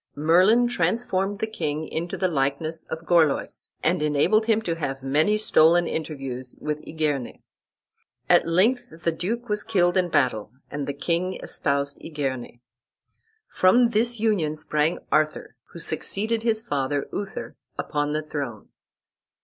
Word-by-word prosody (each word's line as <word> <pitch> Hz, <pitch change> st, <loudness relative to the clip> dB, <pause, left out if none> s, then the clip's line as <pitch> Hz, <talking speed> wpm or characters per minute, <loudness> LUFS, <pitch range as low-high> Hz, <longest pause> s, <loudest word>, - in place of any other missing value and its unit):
Merlin 185 Hz, +11 st, +4 dB
transformed 195 Hz, -1 st, 0 dB
the 215 Hz, -, -1 dB
king 155 Hz, -8 st, -3 dB
into 170 Hz, +2 st, -4 dB
the 185 Hz, -, +1 dB
likeness 155 Hz, +1 st, -2 dB
of 160 Hz, +1 st, -6 dB
Gorlois, 165 Hz, -5 st, +1 dB
and 170 Hz, 0 st, +1 dB
enabled 150 Hz, +9 st, +2 dB
him 225 Hz, -1 st, +3 dB
to 170 Hz, -, -1 dB
have 135 Hz, -5 st, -4 dB
many 155 Hz, +10 st, +2 dB
stolen 175 Hz, -4 st, +4 dB
interviews 135 Hz, -6 st, -4 dB
with 150 Hz, 0 st, -3 dB
Igerne. 150 Hz, -5 st, -2 dB, 0.8 s
At -, -, +4 dB
length 185 Hz, -1 st, +1 dB
the 170 Hz, -, +2 dB
duke 230 Hz, +9 st, -3 dB
was 210 Hz, -1 st, 0 dB
killed 180 Hz, -5 st, +2 dB
in 180 Hz, -1 st, +2 dB
battle 120 Hz, -8 st, 0 dB, 0.2 s
and 145 Hz, -1 st, -4 dB
the 140 Hz, -, -3 dB
king 175 Hz, +5 st, -1 dB
espoused 140 Hz, 0 st, -1 dB
Igerne. 130 Hz, -6 st, -4 dB, 0.9 s
From 235 Hz, +6 st, +4 dB
this 235 Hz, +1 st, +1 dB
union 195 Hz, -9 st, +1 dB
sprang 155 Hz, +1 st, 0 dB
Arthur, 155 Hz, -4 st, 0 dB
who -, -, -13 dB
succeeded 210 Hz, +8 st, -2 dB
his 225 Hz, -1 st, 0 dB
father, 140 Hz, -2 st, -1 dB
Uther, 200 Hz, -1 st, -5 dB, 0.2 s
upon 145 Hz, -1 st, -1 dB
the 155 Hz, +1 st, -1 dB
throne. 140 Hz, -8 st, -5 dB
165 Hz, 140 wpm, -24 LUFS, 145-200 Hz, 0.9 s, Merlin